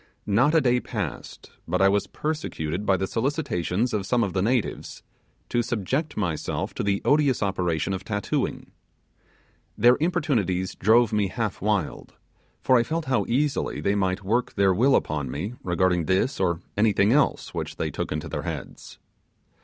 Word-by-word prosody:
Not 120 Hz, +10 st, +3 dB
a 160 Hz, -, +5 dB
day 125 Hz, -2 st, +3 dB
passed 105 Hz, -, -6 dB, 0.2 s
but 90 Hz, +2 st, 0 dB
I 95 Hz, -, +5 dB
was 100 Hz, +1 st, +1 dB
persecuted 105 Hz, -, -3 dB
by 95 Hz, -, +4 dB
the 95 Hz, -, -1 dB
solicitations 120 Hz, -, -1 dB
of 100 Hz, -3 st, -1 dB
some 120 Hz, 0 st, +2 dB
of 100 Hz, -, -2 dB
the 95 Hz, -, 0 dB
natives 120 Hz, +2 st, -1 dB, 0.5 s
to 120 Hz, -, +1 dB
subject 125 Hz, -, -2 dB
myself 85 Hz, -7 st, -2 dB
to -, -, -3 dB
the 100 Hz, -1 st, 0 dB
odious 145 Hz, -6 st, +3 dB
operation 90 Hz, -2 st, -1 dB
of 95 Hz, 0 st, -4 dB
tattooing. 105 Hz, 0 st, -2 dB, 1.1 s
Their 120 Hz, +3 st, +5 dB
importunities 130 Hz, -, 0 dB
drove 110 Hz, +2 st, +3 dB
me 105 Hz, -2 st, +2 dB
half 110 Hz, 0 st, -3 dB
wild, 100 Hz, -6 st, -2 dB, 0.5 s
for 130 Hz, -, +5 dB
I -, -, +4 dB
felt 160 Hz, +6 st, -2 dB
how 130 Hz, -2 st, +1 dB
easily 140 Hz, +4 st, 0 dB
they 100 Hz, -, +1 dB
might 95 Hz, -1 st, 0 dB
work 115 Hz, +5 st, 0 dB
their 100 Hz, -2 st, +4 dB
will 130 Hz, +8 st, +4 dB
upon 75 Hz, -3 st, -1 dB
me 80 Hz, -, -4 dB
regarding 90 Hz, -1 st, +1 dB
this 95 Hz, -, +1 dB
or 85 Hz, -2 st, 0 dB
anything 105 Hz, -1 st, +3 dB
else 140 Hz, +1 st, +1 dB
which -, -, -4 dB
they -, -, -2 dB
took -, -, -4 dB
into 75 Hz, 0 st, -3 dB
their 75 Hz, -, -4 dB
heads. 80 Hz, -5 st, -7 dB
105 Hz, 165 wpm, -25 LUFS, 95-125 Hz, 1.1 s, a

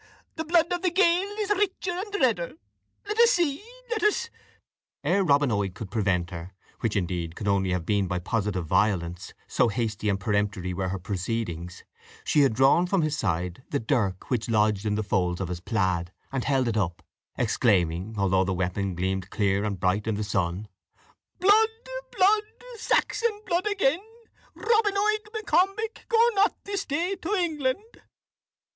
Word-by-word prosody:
The 320 Hz, -, -3 dB
blood 335 Hz, +1 st, +2 dB
of 350 Hz, -, -2 dB
the 370 Hz, -, +2 dB
Gael 360 Hz, +1 st, +3 dB
is 415 Hz, -1 st, -1 dB
richer 390 Hz, -2 st, 0 dB
and 395 Hz, +4 st, -4 dB
redder. 225 Hz, -, +1 dB, 0.5 s
Let 420 Hz, +2 st, -2 dB
us 470 Hz, 0 st, +7 dB
see 335 Hz, -, +1 dB, 0.3 s
let 445 Hz, -2 st, 0 dB
us 425 Hz, +2 st, +1 dB, 0.4 s
" -, -, -67 dB
Ere 195 Hz, -, +2 dB
Robin 145 Hz, -5 st, +3 dB
Oig 100 Hz, -3 st, -1 dB
could 100 Hz, -5 st, -8 dB
prevent 95 Hz, -5 st, 0 dB
her, 85 Hz, +2 st, -8 dB, 0.2 s
which, 115 Hz, -2 st, -1 dB
indeed, 85 Hz, -3 st, -2 dB
could 105 Hz, -, -5 dB
only 100 Hz, -1 st, +2 dB
have 90 Hz, -2 st, -1 dB
been 100 Hz, 0 st, +1 dB
by 90 Hz, 0 st, -1 dB
positive 95 Hz, -1 st, -2 dB
violence, 90 Hz, -1 st, 0 dB
so 125 Hz, -, +2 dB
hasty 110 Hz, -1 st, -1 dB
and 100 Hz, -1 st, 0 dB
peremptory 100 Hz, -3 st, -1 dB
were 95 Hz, +1 st, -2 dB
her 95 Hz, -, -2 dB
proceedings, 90 Hz, -2 st, -4 dB, 0.4 s
she -, -, +2 dB
had 135 Hz, -6 st, +4 dB
drawn 135 Hz, +8 st, +4 dB
from 185 Hz, -2 st, +1 dB
his 155 Hz, -1 st, 0 dB
side 90 Hz, -, -2 dB
the 140 Hz, -, 0 dB
dirk 105 Hz, -5 st, -1 dB
which 120 Hz, -2 st, 0 dB
lodged 105 Hz, -1 st, +2 dB
in 105 Hz, -, +1 dB
the 110 Hz, -, -1 dB
folds 90 Hz, -3 st, 0 dB
of 95 Hz, -3 st, -3 dB
his 90 Hz, -1 st, -4 dB
plaid, 90 Hz, -4 st, -1 dB, 0.2 s
and 135 Hz, -2 st, -2 dB
held 135 Hz, -3 st, +2 dB
it 110 Hz, -1 st, 0 dB
up, 90 Hz, -5 st, -1 dB, 0.3 s
exclaiming, 95 Hz, -1 st, +1 dB
although 95 Hz, -1 st, +2 dB
the 95 Hz, 0 st, -1 dB
weapon 95 Hz, +1 st, -2 dB
gleamed 95 Hz, +1 st, -2 dB
clear 100 Hz, -1 st, +1 dB
and 100 Hz, -3 st, -2 dB
bright 95 Hz, +4 st, 0 dB
in 110 Hz, -, 0 dB
the 105 Hz, -, -2 dB
sun: 95 Hz, 0 st, -1 dB, 0.7 s
"Blood, 415 Hz, +4 st, +5 dB, 0.5 s
blood 405 Hz, +3 st, +5 dB, 0.4 s
Saxon 450 Hz, -1 st, +1 dB
blood 355 Hz, +4 st, 0 dB
again. 380 Hz, -6 st, +1 dB, 0.5 s
Robin 435 Hz, -3 st, +2 dB
Oig 425 Hz, +1 st, +1 dB
M'Combich, 435 Hz, 0 st, 0 dB
go 460 Hz, -, +3 dB, 0.2 s
not 405 Hz, +1 st, +3 dB
this 400 Hz, -1 st, -3 dB
day 340 Hz, +7 st, -1 dB
to 395 Hz, +6 st, -1 dB
England!" 345 Hz, -, -2 dB
110 Hz, 170 wpm, -26 LUFS, -, 0.7 s, us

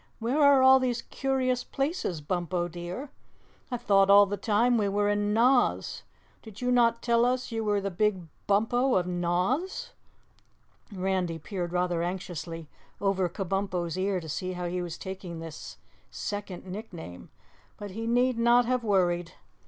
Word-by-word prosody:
"Where 245 Hz, +7 st, 0 dB
are 280 Hz, -2 st, +6 dB
all 265 Hz, 0 st, +8 dB
these 245 Hz, -2 st, -1 dB
curious 260 Hz, -2 st, -1 dB
places, 275 Hz, -, -2 dB
Bumpo 175 Hz, +2 st, -2 dB
dear? 175 Hz, -, -7 dB, 0.6 s
I 245 Hz, -, -2 dB
thought 195 Hz, -4 st, +3 dB
all 200 Hz, +1 st, +8 dB
the 200 Hz, +1 st, -3 dB
time 225 Hz, +4 st, +2 dB
we 205 Hz, -1 st, +1 dB
were 205 Hz, +1 st, +1 dB
in 205 Hz, 0 st, +1 dB
Noz. 245 Hz, +3 st, +2 dB, 0.4 s
Did 220 Hz, -3 st, -12 dB
you 250 Hz, 0 st, 0 dB
not 235 Hz, -1 st, +3 dB
tell 235 Hz, -1 st, +3 dB
us 250 Hz, +1 st, 0 dB
you 225 Hz, -1 st, -2 dB
were 205 Hz, -1 st, +1 dB
the 195 Hz, 0 st, -3 dB
Big 190 Hz, 0 st, 0 dB, 0.2 s
Bumpo 240 Hz, +6 st, +2 dB
of 180 Hz, -, +2 dB
Noz?" 180 Hz, -, -1 dB, 1.0 s
Randy 185 Hz, -3 st, -1 dB
peered 175 Hz, +1 st, -5 dB
rather 180 Hz, -1 st, 0 dB
anxiously 170 Hz, -2 st, -5 dB, 0.3 s
over 195 Hz, -2 st, +1 dB
Kabumpo's 185 Hz, -2 st, -2 dB
ear 190 Hz, 0 st, 0 dB
to 165 Hz, -, -9 dB
see 185 Hz, +4 st, -3 dB
how 180 Hz, 0 st, -4 dB
he 180 Hz, +1 st, -2 dB
was 170 Hz, -2 st, -5 dB
taking 190 Hz, -3 st, -7 dB
this 165 Hz, -1 st, -8 dB, 0.3 s
second 205 Hz, -3 st, -5 dB
nickname, 185 Hz, -, -8 dB, 0.5 s
but 205 Hz, -1 st, -7 dB
he 225 Hz, +4 st, -5 dB
need 245 Hz, +1 st, +2 dB
not 240 Hz, +1 st, +5 dB
have 250 Hz, 0 st, 0 dB
worried. 175 Hz, -5 st, +1 dB
200 Hz, 155 wpm, -28 LUFS, 180-240 Hz, 1.0 s, all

